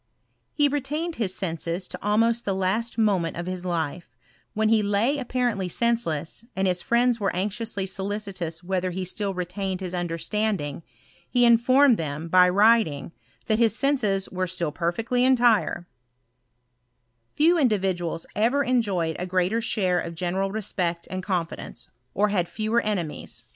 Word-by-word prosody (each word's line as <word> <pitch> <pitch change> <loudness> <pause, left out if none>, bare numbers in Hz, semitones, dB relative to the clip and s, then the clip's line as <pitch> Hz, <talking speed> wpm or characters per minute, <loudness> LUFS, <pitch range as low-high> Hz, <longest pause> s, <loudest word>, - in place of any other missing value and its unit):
H4 290 -1 +4
retained 300 +4 -2
his 195 -5 -1
senses' 170 0 -3
to - - -7
almost 225 +3 +2
the 195 - -1
last 200 +6 -1
moment 195 -8 +1
of 175 - -4
his 185 0 -4
life: 165 -5 -3 0.4
when 215 0 +2
he 220 -1 +4
lay 210 +8 +1
apparently 245 -7 -1
senseless, 195 -7 -1
and 190 0 +1
his 180 -1 +1
firiends 240 +2 +2
were 195 -2 0
anxiously 205 +1 -2
solicitous 190 -4 -4
whether 185 0 -1
he 185 +1 -4
still 195 +1 -2
re 180 0 -2
tained 190 +1 -4
his 185 -2 -5
understanding, 175 -2 -2 0.5
he 245 -1 +3
informed 240 +2 +5
them, 155 +1 -4
by 180 +1 +6
writing, 195 - +3 0.3
that 215 0 +1
his 225 -3 +3
senses 220 -9 +1
were 185 0 -2
still 170 -3 -2
perfectly 225 +10 0
entire* 235 -8 +3 1.5
Few 335 +3 +4
individuals 190 - 0
ever 245 +7 +2
enjoyed 200 - 0
a 180 - -3
greater 185 +5 +1
share 185 -5 +1
of 170 0 -5
gene 175 +1 -2
ral 195 +1 0
respect 180 -5 -3
and 185 0 -3
confidence, 175 - -4 0.3
or 210 +1 +2
had 180 -4 0
fewer 220 +4 0
enemies 185 -8 -4
195 Hz, 150 wpm, -25 LUFS, 175-230 Hz, 1.5 s, by